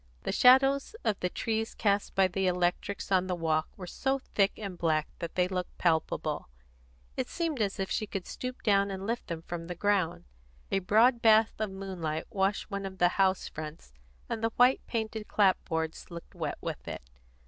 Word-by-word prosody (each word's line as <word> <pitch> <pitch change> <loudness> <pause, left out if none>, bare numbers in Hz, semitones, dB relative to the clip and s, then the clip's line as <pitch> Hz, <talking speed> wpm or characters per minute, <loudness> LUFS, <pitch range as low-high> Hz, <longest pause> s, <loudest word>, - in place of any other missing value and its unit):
The - - -1
shadows 270 - +5
of 210 - 0
the 180 - 0
trees 225 +3 -2
cast 200 -1 0
by 195 -1 +5
the 190 +1 -1
electrics 180 +3 -1
on 185 -1 +3
the 180 - -1
walks 160 -2 -1
were 185 - -7
so 265 +9 -1
thick 205 -6 +1
and 200 -4 -5
black 155 -3 +1
that 170 -2 -5
they 180 -1 +3
looked 180 -1 -4
palpable; 160 - 0 0.7
it - - -2
seemed 325 -7 -2
as 200 0 -1
if 190 - -2
she 215 - -1
could 195 -3 -5
stoop 255 0 -6
down 200 -2 +3
and 190 0 -5
lift 230 +3 -3
them 165 -1 -5
from 165 -1 -6
the 180 - -5
ground. 175 -3 0 0.5
A 195 - +2
broad 225 +6 +4
bath 220 0 +5
of 215 -1 -1
moonlight 185 -5 -4
washed 195 +2 0
one 200 0 -3
of 190 0 -10
the 175 -1 +4
house 190 0 +1
fronts, 155 - -8 0.3
and 225 - -4
the 225 - +3
white 250 +2 +5
painted 220 -2 -3
clapboards 160 -5 0
looked 170 -1 -10
wet - - -3
with - - -5
it. - - -6
195 Hz, 190 wpm, -30 LUFS, 175-220 Hz, 0.7 s, shadows